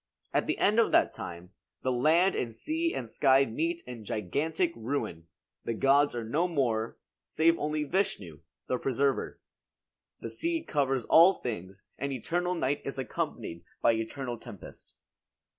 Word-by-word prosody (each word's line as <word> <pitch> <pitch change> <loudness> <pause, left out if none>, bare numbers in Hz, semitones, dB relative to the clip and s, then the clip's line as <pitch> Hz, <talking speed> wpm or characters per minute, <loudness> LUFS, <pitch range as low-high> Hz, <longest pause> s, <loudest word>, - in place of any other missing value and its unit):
At - - +1
the - - 0
end 215 +3 +3
of 230 - +4
that - - +4
time, 85 +2 -8 0.3
the 130 - +1
land 160 +9 +4
and 115 -3 -3
sea 325 - -1
and 120 - -4
sky 135 +3 +4
meet 165 +8 -2
in 125 -3 -8
gigantic 155 - -1
ruin; 110 - -3 0.4
the 115 - -2
gods 140 +3 +4
are 120 - -2
no 150 +11 +1
more, 120 -9 0 0.3
save 165 +1 +3
only 150 0 -1
Vishnu, 120 - -1 0.3
the 125 - -1
preserver. 135 +1 0 0.8
The - - -6
sea 330 -1 -1
covers 135 - 0
all 175 +4 +7
things 95 -5 -6 0.2
and 140 +1 -2
eternal 175 +8 -1
night 145 -3 0
is 135 - -5
accompanied 85 -9 -4 0.2
by 115 - +6
eternal 120 +2 -3
tempest. - - -12
135 Hz, 150 wpm, -29 LUFS, 115-165 Hz, 0.8 s, all